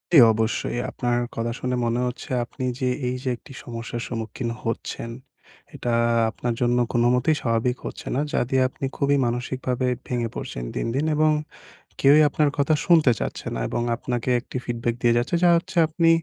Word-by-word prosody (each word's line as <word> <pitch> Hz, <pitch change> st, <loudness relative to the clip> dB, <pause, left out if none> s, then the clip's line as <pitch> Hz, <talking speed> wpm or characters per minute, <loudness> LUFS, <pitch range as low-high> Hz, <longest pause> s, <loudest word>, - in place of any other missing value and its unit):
জি, -, -, +11 dB
অবশ্যই 110 Hz, +2 st, -1 dB
আপনার 120 Hz, -1 st, 0 dB, 0.2 s
কথা 115 Hz, +1 st, -1 dB
শুনে 125 Hz, 0 st, -1 dB
মনে 115 Hz, +1 st, 0 dB
হচ্ছে 125 Hz, -, -6 dB, 0.2 s
আপনি 130 Hz, -, -8 dB, 0.2 s
যে 130 Hz, -, +1 dB, 0.2 s
এই 125 Hz, -, -1 dB
যে 130 Hz, -, -1 dB
একটি -, -, -16 dB
সমস্যার 120 Hz, 0 st, -5 dB
সম্মুখীন 115 Hz, +1 st, -4 dB
হচ্ছেন, 115 Hz, 0 st, -4 dB, 0.7 s
এটা 120 Hz, -1 st, -2 dB, 0.4 s
আপনার 120 Hz, +1 st, -3 dB
জন্য 120 Hz, 0 st, +3 dB, 0.2 s
কোনোমতেই 125 Hz, +5 st, +3 dB
স্বাভাবিক 115 Hz, +1 st, 0 dB
হচ্ছে -, -, -7 dB
না -, -, +1 dB
যা -, -, +1 dB
দিয়ে 130 Hz, -1 st, +3 dB
আপনি 135 Hz, -, -5 dB
খুবই 140 Hz, 0 st, +2 dB
মানসিকভাবে 125 Hz, +1 st, -1 dB, 0.2 s
ভেঙে 120 Hz, -2 st, -1 dB
পড়ছেন -, -, -5 dB
দিন, -, -, -1 dB
দিন 145 Hz, +3 st, +1 dB
এবং 155 Hz, 0 st, +4 dB, 0.7 s
কেউই 145 Hz, +3 st, +6 dB
আপনার 150 Hz, +1 st, +2 dB
কথা 145 Hz, +2 st, +3 dB
শুনতে 160 Hz, -7 st, +6 dB
চাচ্ছে -, -, -4 dB
না -, -, -3 dB
এবং -, -, -1 dB
আপনাকে 120 Hz, +1 st, -3 dB
একটি 125 Hz, -, -7 dB
ফিডব্যাক 120 Hz, -1 st, -1 dB
দিয়ে 120 Hz, -1 st, +4 dB
যাচ্ছে 120 Hz, +8 st, 0 dB
যা 175 Hz, -, +7 dB
হচ্ছে 185 Hz, +2 st, -5 dB
আপনি 165 Hz, +1 st, +2 dB
125 Hz, 175 wpm, -24 LUFS, 120-140 Hz, 0.7 s, জি